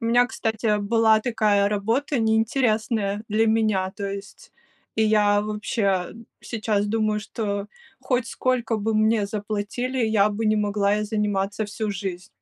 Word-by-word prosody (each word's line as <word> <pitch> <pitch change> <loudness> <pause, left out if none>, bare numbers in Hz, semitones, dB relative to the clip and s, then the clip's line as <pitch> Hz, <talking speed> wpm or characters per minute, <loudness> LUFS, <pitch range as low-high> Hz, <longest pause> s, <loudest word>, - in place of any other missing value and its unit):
У - - -5
меня, 245 +2 +4
кстати, 220 -2 -1
была 220 +1 +3
такая 215 -4 +2
работа 230 +8 0
неинтересная 220 -2 +1
для 220 +2 +2
меня, 215 -4 +1
то 200 - -7
есть. 195 0 -8 0.4
И 220 - +3
я 210 -1 +3
вообще 210 -3 -1 0.3
сейчас 210 -3 -1
думаю, 215 0 0
что 205 -2 -4 0.3
хоть 250 -3 0
сколько 245 -3 -1
бы 215 +1 -1
мне 215 -1 +2
заплатили, 215 +5 -3
я 220 -3 +3
бы 215 +2 -3
не 215 0 +3
могла 205 -1 +1
ей 210 - -1
заниматься 205 -1 -1
всю 215 0 -3
жизнь. 190 -1 -5
215 Hz, 145 wpm, -24 LUFS, 205-225 Hz, 0.4 s, меня